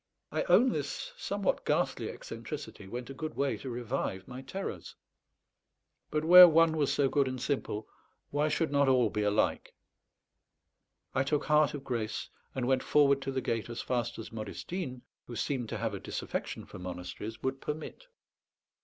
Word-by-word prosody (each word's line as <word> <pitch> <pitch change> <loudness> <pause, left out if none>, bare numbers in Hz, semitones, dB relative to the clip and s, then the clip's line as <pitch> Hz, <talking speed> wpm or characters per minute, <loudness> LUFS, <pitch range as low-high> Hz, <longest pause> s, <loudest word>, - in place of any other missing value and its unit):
I - - 0
own 260 - +6
this - - -4
somewhat - - -1
ghastly - - 0
eccentricity 150 - -7
went 120 +5 -6
a - - -6
good 155 +3 -5
way 140 0 +1
to 135 - -7
revive 120 -5 -3
my 125 +1 -7
terrors. 190 +9 -6 1.1
But 155 0 -1
where 180 +2 +12
one 165 0 +5
was 145 -3 +2
so 140 - +3
good 140 0 +2
and 130 0 -3
simple, 120 -5 -2 0.4
why 145 +1 +2
should 155 0 0
not 140 -1 +3
all 125 -5 +4
be 105 - -1
alike? 105 +1 +1 1.4
I 130 - +2
took 145 +2 +1
heart 150 -1 +4
of 140 - -7
grace, 115 -5 -3 0.3
and 130 -2 -1
went 130 0 +3
forward 140 -2 +4
to 135 - -3
the 130 0 -1
gate 115 -1 -2
as 120 0 -4
fast 120 -2 -1
as 115 - -7
Modestine, 125 - -5 0.2
who 120 - -7
seemed 125 -2 -2
to - - -3
have - - -2
a - - -4
disaffection - - -4
for - - -10
monasteries, 90 +4 -6
would 135 0 -2
permit. 155 - -6
135 Hz, 170 wpm, -31 LUFS, 120-150 Hz, 1.4 s, where